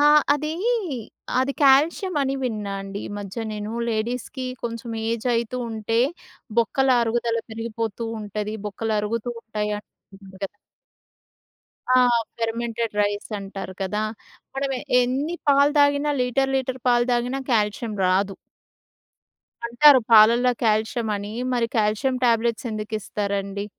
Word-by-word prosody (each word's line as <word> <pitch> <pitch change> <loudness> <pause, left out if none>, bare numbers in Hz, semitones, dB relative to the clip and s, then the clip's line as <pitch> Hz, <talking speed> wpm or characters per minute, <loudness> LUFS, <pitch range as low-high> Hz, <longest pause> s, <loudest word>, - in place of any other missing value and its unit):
ఆహ్, 295 0 +6
అదీ, 305 +2 -3 0.9
అది 270 +1 0
కాల్షియమని 285 +1 +3
విన్నా 210 -5 -2
అండి. 195 +1 -6
ఈ - - -9
మధ్య 205 +3 -5
నేను 210 +1 -5 0.2
లేడీస్‌కి 245 +4 -3 0.2
కొంచెం 230 0 -5 0.2
ఏజయితూ 235 +1 -1
ఉంటే, 225 +1 0 0.6
బొక్కల 265 +4 +2
అరుగుదల 230 0 0
పెరిగిపోతూ 225 0 -4
ఉంటది. 210 +1 -4
బొక్కలు 220 +2 -2
అరుగుతూ 230 +3 -2
ఉంటాయి 210 -1 -3
అన్ - - -13 0.6
గద్ 195 +1 -4 1.4
ఆ! - - +7 0.4
ఫెర్మెంటెడ్ 230 -1 -2
రైసంటారు 205 -2 -4
కదా! 210 +3 -1 0.5
మనం 275 0 -1 0.3
ఎన్ని 270 +7 0
పాలు 280 +1 +5
తాగినా 285 +1 +3
లీటర్ 270 +2 +1
లీటర్ 260 -1 -2
పాలు 240 0 +4
తాగినా 245 +3 0
కాల్షియం 215 0 0
రాదు. 195 +1 +1 1.3
అంటారు 265 +3 +7
పాలల్లో 235 +3 +7
కాల్షియమని 215 -1 0 0.2
మరి 235 -2 +1
కాల్షియం 215 +5 +1
ట్యాబ్‌లెట్స్ 235 0 +2
ఎందుకిస్తారండి? 200 -2 -3
230 Hz, 110 wpm, -23 LUFS, 210-255 Hz, 1.4 s, ఆ